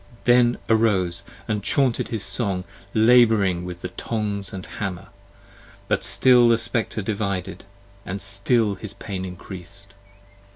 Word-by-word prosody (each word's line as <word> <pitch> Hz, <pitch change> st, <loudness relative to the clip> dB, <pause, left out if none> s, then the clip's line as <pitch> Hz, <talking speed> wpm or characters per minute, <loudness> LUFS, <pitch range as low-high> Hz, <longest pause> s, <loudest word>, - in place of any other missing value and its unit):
Then 120 Hz, 0 st, +4 dB
arose 100 Hz, -6 st, +2 dB, 0.3 s
And 105 Hz, -1 st, -1 dB
chaunted 130 Hz, -1 st, +1 dB
his 110 Hz, -4 st, -3 dB
song, 95 Hz, -4 st, -2 dB, 0.3 s
labouring 110 Hz, -6 st, +4 dB
with 90 Hz, -1 st, -7 dB
the 90 Hz, -, -4 dB
tongs 105 Hz, 0 st, -3 dB
and 95 Hz, -1 st, -7 dB
hammer: 95 Hz, -4 st, -5 dB, 0.8 s
But -, -, 0 dB
still 125 Hz, -2 st, +5 dB
the 115 Hz, -, +5 dB
Spectre 115 Hz, -2 st, -2 dB
divided, 100 Hz, -3 st, -3 dB, 0.4 s
and 95 Hz, +1 st, -5 dB
still 100 Hz, +3 st, +1 dB
his 100 Hz, +1 st, -8 dB
pain 95 Hz, -1 st, -6 dB
increas'd! 95 Hz, +2 st, -10 dB
100 Hz, 125 wpm, -23 LUFS, 95-115 Hz, 0.8 s, still